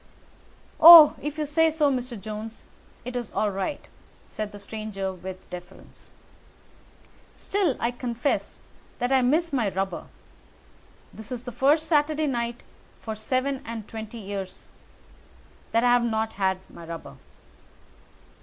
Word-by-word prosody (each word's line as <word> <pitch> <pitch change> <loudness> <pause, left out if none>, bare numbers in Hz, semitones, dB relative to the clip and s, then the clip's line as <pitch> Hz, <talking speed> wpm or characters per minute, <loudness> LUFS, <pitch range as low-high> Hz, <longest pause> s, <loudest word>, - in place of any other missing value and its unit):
"Oh, 325 -2 +11
if 295 +1 -5
you 305 - -1
say 320 +3 +3
so, 305 -2 +2
Mr. 250 -3 -4
Jones, 215 +2 -8 0.4
it 250 - -6
is 240 -3 -3
all 210 -1 0
right," 195 +9 -4 0.4
said 215 -1 -6
the 205 - -10
stranger 200 -2 -5
with 185 +1 -9
deference. 180 +1 -12 1.3
"Still, 385 -9 -1
I 235 - 0
confess 245 +2 -2 0.4
that 245 +1 -1
I 265 -1 +4
miss 310 +6 +1
my 235 -7 +1
rubber. 195 +1 -3 1.1
It 220 +1 -9
is 245 -1 -5
the 250 - -6
first 285 +6 +2
Saturday 305 0 +2
night 240 -3 -2 0.4
for 220 - -5
seven 255 +5 -2
and 225 -2 -7
twenty 220 +1 -8
years 195 -3 -7 1.0
that 230 +1 +1
I 245 0 +5
have 245 -1 +3
not 220 -1 -1
had 190 -1 0
my 170 - -13
rubber." 165 - -9
235 Hz, 135 wpm, -25 LUFS, 205-275 Hz, 1.3 s, Oh